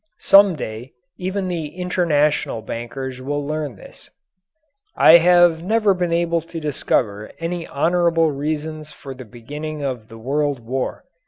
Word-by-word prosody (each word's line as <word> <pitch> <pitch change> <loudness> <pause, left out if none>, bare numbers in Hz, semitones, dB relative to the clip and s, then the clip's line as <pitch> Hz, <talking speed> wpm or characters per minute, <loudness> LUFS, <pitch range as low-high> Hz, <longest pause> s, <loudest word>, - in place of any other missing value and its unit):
Some 195 -2 +6
day 115 -2 -7 0.3
even 190 +1 -2
the 170 -4 -3
international 155 -9 0
bankers 125 +3 -6
will 145 +2 -3
learn 150 -4 -3
this. - - -15 0.9
I 165 - +8
have 175 -1 +4
never 210 +2 +2
been 180 -2 -2
able 170 0 +1
to 165 +1 -8
discover 110 -8 -1
any 170 0 -4
honourable 165 +1 +2
reasons 155 +1 -4
for 135 - -9
the 130 -1 -11
beginning 145 +7 -7
of 125 -5 -4
the 115 - -12
World 140 +3 -1
War. 125 +3 -4
150 Hz, 140 wpm, -21 LUFS, 130-170 Hz, 0.9 s, I